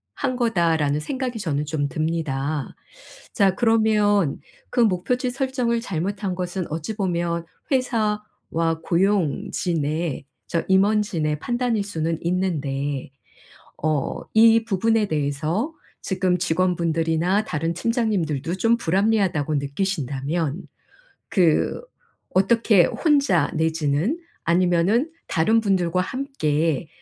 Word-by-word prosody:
한 255 - -1
거다.'라는 165 - +1
생각이 255 - -3
저는 150 -6 -1
좀 150 -1 -1
듭니다. 155 -2 -2 0.6
자 195 -4 +3
그러면 210 - +2 0.3
그 - - -1
목표치 235 +5 +1
설정을 250 -3 0
잘못한 195 0 -3
것은 180 0 -3
어찌 165 +7 -4
보면 170 -3 -1 0.3
회사와 210 -9 -1
고용진의 170 -4 0 0.2
저 165 - -1
임원진의 190 -6 +2
판단일 240 0 0
수는 165 -4 -2
있는데 145 -7 -2 0.7
어 155 -3 0
이 225 0 +6
부분에 225 +1 +1
대해서 155 - -1 0.3
지금 185 -2 0
직원분들이나 170 +2 +1
다른 165 0 -2
팀장님들도 180 - -1
좀 225 +5 +3
불합리하다고 190 -6 +1
느끼신다면 145 0 -2 0.7
그 175 - +2 0.5
어떻게 195 -1 +4
혼자 280 - +2
내지는 160 - 0 0.3
아니면은 180 - +2 0.2
다른 220 +8 +2
분들과 185 -3 +1
함께 165 - -1
180 Hz, 240 characters per minute, -23 LUFS, 160-215 Hz, 0.7 s, 이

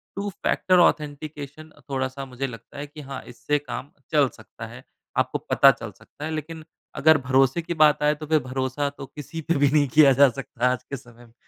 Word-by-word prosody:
2 200 +1 -3
-factor 185 -1 +1
authentication 150 -1 -1 0.2
थोड़ा-सा 135 0 -3
मुझे 130 +1 -4
लगता 115 0 -11
है 145 +1 -5
कि 150 +1 -11
हाँ, 135 -2 -7
इससे 145 +4 -2
काम 145 0 -7 0.2
चल 145 -4 +4
सकता - - -10
है। - - -12 0.3
आपको - - +1
पता - - +5
चल - - -8
सकता 150 - -11
है। 160 - -4
लेकिन 155 +1 -5 0.3
अगर 160 +1 +5
भरोसे 135 +4 +3
की 170 - -4
बात 150 -2 +4
आए 150 0 +3
तो 155 +1 -8
फिर 155 0 +3
भरोसा 130 +2 -2
तो 140 -1 -10
किसी 150 +4 -8
पे 170 - +2
भी 145 0 +4
नहीं 145 -2 +3
किया 150 -3 +8
जा 140 - +9
सकता 125 -1 -4
है 125 - +5
आज 130 - -6
के 140 - -6
समय 120 -1 -17
में। 115 - -23
145 Hz, 215 wpm, -24 LUFS, 130-155 Hz, 0.3 s, जा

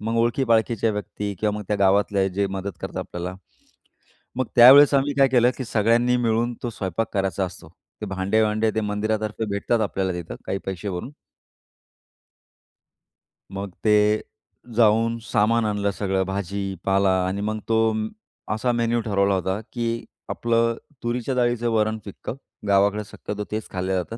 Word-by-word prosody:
मग 115 +2 -2
ओळखी-पाळखीच्या 115 -2 +2
व्यक्ती 105 0 -4
किंवा 105 -1 0
मग 105 - -5
त्या 105 - +1
गावातले 100 0 +2
जे 100 +2 0
मदत 95 +1 -4
करतात - - -5
आपल्याला, 90 +1 -5 1.0
मग 130 0 0
त्यावेळेस 135 +4 +9
आम्ही 140 +1 +2
काय 135 -1 +6
केलं, 125 -1 +4
की 130 - -3
सगळ्यांनी 115 +3 +2
मिळून 120 0 0
तो 120 - -2
स्वयंपाक 100 0 -3
करायचा 95 -1 0
असतो. 90 -3 -9 0.3
ते - - -2
भांडे-वांडे 105 +3 +1
ते - - +2
मंदिरातर्फे 110 +1 -2
भेटतात 100 +3 0
आपल्याला 95 -3 -1
तिथं 85 -2 -6
काही 95 - -1
पैसे 95 +1 -4
भरून 90 +8 -5 2.4
मग 100 0 -6
ते 105 0 +4 0.5
जाऊन 115 +1 +3
सामान 115 +1 +2
आणलं 105 -1 0
सगळं 95 -1 -1
भाजी, 95 0 -3
पाला 95 0 +3 0.2
आणि 95 +2 -2
मग 110 +1 -2
तो 110 0 +3 0.6
असा 115 +3 0
मेन्यू 120 0 +1
ठरवला 100 -2 +1
होता, 95 +2 -1
की 115 -1 -2 0.2
आपलं 115 0 +1 0.3
तुरीच्या 120 +2 -2
डाळीचं 120 -1 +1
वरण 110 0 +1
फिकं, 100 +3 -7 0.3
गावाकडे 100 +1 +3
शक्यतो 105 +1 -6
तेच 110 0 -4
खाल्ल्या 95 0 -1
जातं, 115 - -8
105 Hz, 145 wpm, -23 LUFS, 100-115 Hz, 2.4 s, त्यावेळेस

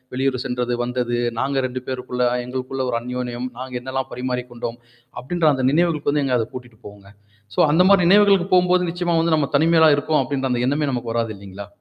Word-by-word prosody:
வெளியூர் 130 -1 0
சென்றது, 125 -1 -2
வந்தது. 120 -1 -2 0.2
நாங்க 135 0 0
2 130 0 -6
பேருக்குள்ள 125 -1 -3 0.2
எங்களுக்குள்ள 130 +1 -4
ஒரு 115 - 0
அன்யோணியம். 125 0 -4
நாங்க 130 0 -7
என்னல்லாம் 130 0 -4
பரிமாறிக் 125 0 -4
கொண்டோம். 120 0 -6 0.4
அப்ப்டின்ற 165 +5 0
அந்த 130 -1 -1
நினைவுகளுக்கு 155 -2 +1
வந்து 145 0 0
எங்க 130 -2 +1
அத 115 - 0
கூட்டிட்டு 120 -3 -10
போகுங்க. 100 -1 -14 0.5
சோ - - -2
அந்த 165 +4 +4
மாரி 200 -2 +5
நினைவுகளுக்கு 200 -1 +5
போகும்போது 180 0 +4
நிச்சயமா 175 0 -1
வந்து 165 -1 +2
நம்ம 140 -2 0
தனிமையில 160 0 +5
இருக்கோம், 150 0 +1
அப்டின்ற 135 0 -2
அந்த 120 - -1
எண்ணமே 145 +2 0
நமக்கு 120 -2 -3
வராது 115 -2 -1
இல்லைங்களா? 100 0 -10
130 Hz, 190 wpm, -21 LUFS, 125-155 Hz, 0.5 s, மாரி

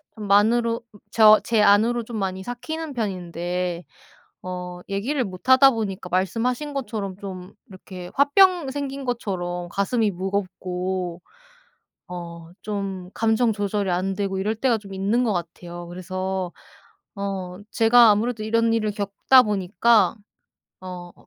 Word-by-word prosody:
좀 210 -2 -7
만으로 230 +3 +3 0.3
저 215 -1 +7
제 225 -2 +2
안으로 225 +4 +4
좀 225 -1 -7
많이 190 -1 -3
삭히는 310 +6 -5
편인데 180 -4 -3 0.6
어 180 -1 -6
얘기를 245 +8 -1
못하다 260 +8 +5
보니까 205 -6 -4
말씀하신 240 - -1
것처럼 210 -7 -4
좀 185 -2 -8
이렇게 185 -2 -10
화병 330 +1 +4
생긴 275 -1 -4
것처럼 180 -7 -3
가슴이 205 +3 +1
무겁고 185 -1 -3 0.9
어 170 -1 -8
좀 195 -3 -4
감정 225 +1 +2
조절이 205 -1 -1
안 185 +2 0
되고 195 -1 -2
이럴 210 +3 -1
때가 235 +1 +1
좀 200 -2 -11
있는 205 +6 +1
것 220 - +1
같아요. 175 0 -6
그래서 185 0 -4 0.6
어 190 -2 -4
제가 230 0 +6
아무래도 215 +1 0
이런 230 +1 +2
일을 215 -2 0
겪다 205 +5 +4
보니까 210 +1 +2 0.7
어 180 -1 -8
200 Hz, 260 characters per minute, -23 LUFS, 185-230 Hz, 0.9 s, 저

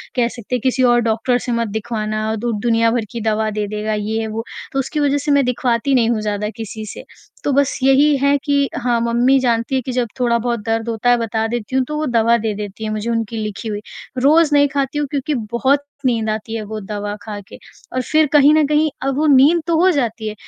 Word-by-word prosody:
कह 240 -2 +2
सकते 235 +1 -5
हैं 245 - -2
किसी 260 0 +1
और 240 - +4
डॉक्टर 230 +3 +1
से 245 - -2
मत 230 -1 0
दिखवाना 215 0 -3
दु 235 +2 -2
दुनिया 230 -1 +3
भर 230 -2 -1
की 235 - -5
दवा 220 0 0
दे 210 -1 -2
देगा, 215 +1 -3
ये 220 +1 -2
वो, 220 +1 -4 0.3
तो 270 - 0
उसकी 285 +3 -2
वजह 285 0 +2
से 290 +1 -1
मैं 280 -1 +4
दिखवाती 250 +1 0
नहीं 230 -2 +3
हूँ 220 -2 0
ज़्यादा 210 0 -2
किसी 220 -1 -6
से। - - -9 0.4
तो 285 - 0
बस 280 0 +2
यही 280 +2 +5
है 280 +1 +3
कि 280 -1 +2
हाँ, 240 -1 +2
मम्मी 240 +3 +3
जानती 235 +1 0
है 260 - +1
कि 255 - -5
जब 245 -2 0
थोड़ा-बहुत 235 -1 +1
दर्द 225 +1 -1
होता 230 +2 0
है 245 - +5
बता 225 -1 -1
देती 240 +1 -4
हूँ, 265 - +3
तो 300 +2 -4
वो 310 - -1
दवा 235 -2 +3
दे 220 -1 -2
देती 205 +1 -7
हैं 215 - -2
मुझे, 215 +2 -3
उनकी 225 -1 -2
लिखी 210 +1 -5
हुई 210 -1 -3 0.4
रोज़ 300 +4 +4
नहीं 285 0 +5
खाती 275 0 -1
हूँ 290 - -1
क्योंकि 290 +1 -1 0.2
बहुत 270 +4 +2 0.2
नींद 225 -3 +1
आती 220 +1 -3
है 225 - -3
वो 215 +1 -6
दवा 205 0 -5
खा 210 -1 -6
के - - -12 0.4
और 255 - 0
फ़िर 310 +5 +2
कहीं 295 0 +6
न 310 -1 +4
कहीं 300 +1 +2 0.2
अब 270 - 0
वो 305 - +1
नींद 290 +5 +5
तो 335 - +2
हो 375 - +5
जाती 235 -7 -2
है, 215 - -3
235 Hz, 240 wpm, -19 LUFS, 220-275 Hz, 0.4 s, कहीं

